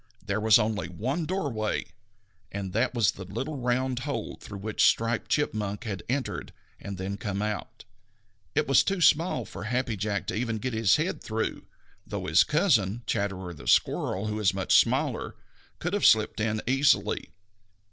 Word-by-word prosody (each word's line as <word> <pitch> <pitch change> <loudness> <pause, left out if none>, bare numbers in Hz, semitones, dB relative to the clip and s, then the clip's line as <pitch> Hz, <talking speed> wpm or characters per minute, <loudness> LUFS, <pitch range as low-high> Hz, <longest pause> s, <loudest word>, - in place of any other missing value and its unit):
There 100 +1 -1
was 110 0 +6
only 105 -4 -1
one 130 - -2
doorway, 140 - -1 0.7
and 95 -2 -5
that 125 +4 +1
was 110 -6 +3
the 95 - -9
little 130 - -4
round 125 +1 0
hole 130 -4 -4
through 100 - -8
which 105 +2 -1
Striped 115 0 +2
Chipmunk 105 -8 -1
had 100 -6 -4
entered 125 -9 -3 0.3
and 100 -1 -6
then 95 +2 -4
come 100 -4 -3
out. 105 0 -4 0.7
It - - +2
was 135 - +6
too 195 -1 -1
small 160 -6 +3
for 100 - -8
Happy 125 0 -1
Jack 100 0 -2
to - - -3
even 115 0 -1
get 125 +3 -3
his 110 -5 +4
head - - -1
through, - - -3 0.4
though - - -5
his 80 +3 +5
cousin, 120 - +2
Chatterer 95 -3 -2
the 75 - -12
Red - - -1
Squirrel, 95 +3 +2
who 105 0 -2
is 95 -3 +2
much 95 - 0
smaller, - - +2 0.4
could 175 +3 -3
have 205 - +4
slipped 110 -1 +4
in 110 0 -1
easily. 130 -6 +2
110 Hz, 170 wpm, -27 LUFS, 100-130 Hz, 0.7 s, was